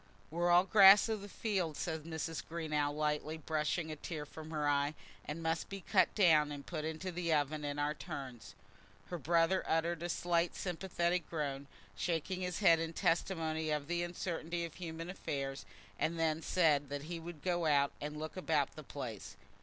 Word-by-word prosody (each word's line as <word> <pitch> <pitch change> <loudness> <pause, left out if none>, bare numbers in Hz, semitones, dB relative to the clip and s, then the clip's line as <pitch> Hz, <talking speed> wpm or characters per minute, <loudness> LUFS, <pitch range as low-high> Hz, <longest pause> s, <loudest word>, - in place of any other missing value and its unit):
"We're 175 +2 +1
all 175 +1 +7
grass 195 +1 +8
of 220 -2 -1
the 205 - -8
field," 185 -8 -1
said 160 -2 -3
Mrs. 160 -1 -3
Greenow, 155 -3 -1
lightly 150 +1 -1
brushing 155 +1 -1
a - - -4
tear 150 0 -5
from 155 +1 -10
her 150 -2 -1
eye, 145 +1 +2 0.3
"and 165 +3 -5
must 165 0 -1
be 195 -1 -6
cut - - +3
down 155 -7 +5
and 145 -1 -7
put 155 -4 -4
into 160 +4 -3
the 170 -1 -2
oven 150 0 +1
in 145 0 -3
our 145 +1 +1
turns." 125 -8 -8 0.6
Her 175 - -3
brother 165 +4 +3
uttered 165 +1 +1
a 175 - -3
slight 170 0 +1
sympathetic 175 -1 -1
groan, 140 -3 -3 0.3
shaking 175 - -1
his 180 +1 -3
head 165 -5 +6
in 165 0 -3
testimony 160 -2 0
of 150 -2 0
the 175 0 0
uncertainty 175 -1 -3
of 165 - -8
human 165 -1 -6
affairs, 140 -6 -4 0.3
and 165 +1 0
then 160 -1 +1
said 150 -6 +2
that 145 0 -4
he 170 +2 -5
would 165 -2 -9
go 175 -3 +1
out 140 -2 +4
and 150 +1 -4
look 155 +1 -5
about 155 -6 0
the 155 - -7
place. 125 -8 -7
160 Hz, 185 wpm, -35 LUFS, 150-175 Hz, 0.6 s, grass